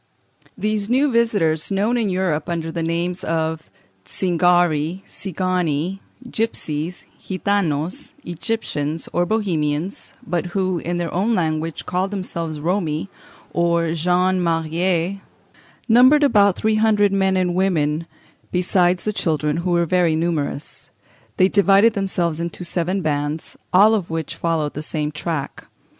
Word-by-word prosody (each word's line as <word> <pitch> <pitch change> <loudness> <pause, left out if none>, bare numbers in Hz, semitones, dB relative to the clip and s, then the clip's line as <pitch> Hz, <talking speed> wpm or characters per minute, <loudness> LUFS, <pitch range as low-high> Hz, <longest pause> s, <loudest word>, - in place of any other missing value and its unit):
These 210 -1 -1
new 270 +3 +3
visitors, 205 -10 +1
known 205 +5 +1
in 225 -4 +1
Europe 180 -5 -1
under 165 -1 -2
the 165 - -3
names 170 +2 -2
of 160 -1 -2 0.3
Zingari, 175 - +1
Cigani, 185 -2 -2 0.3
Gipsies, 175 -8 -3 0.2
Gitanos, 185 - -1
Egyptians, 165 -4 -3
or 175 0 +1
Bohemians, 175 -4 -1
but 175 +1 -1
who, 185 -2 0
in 175 +2 -3
their 170 -1 -3
own 210 +6 +1
language, 160 -2 -2
called 185 +2 -1
themselves 170 -6 -4
Romi, 165 0 -1 0.4
or 170 -1 +1
gens 180 +3 +2
mariés, 170 +3 0 0.7
numbered 255 +6 +6
about 200 -8 +4
three 215 0 +1
hundred 210 -2 +3
men 190 -1 +2
and 180 -1 +1
women, 165 -4 0 0.4
besides 180 0 +2
the 215 - -1
children, 150 -4 0
who 175 +2 -2
were 170 -1 +2
very 170 -1 +2
numerous. 160 -3 -3 0.5
They 185 - +5
divided 200 +3 +4
themselves 175 -5 -1
into 170 +1 -4
seven 180 +2 -1
bands, 145 +1 -2 0.2
all 205 +4 +6
of 200 -6 -1
which 160 -2 -3
followed 160 -3 -1
the 150 - -5
same 150 -1 -3
track. 155 -2 -4
175 Hz, 130 wpm, -21 LUFS, 160-195 Hz, 0.7 s, numbered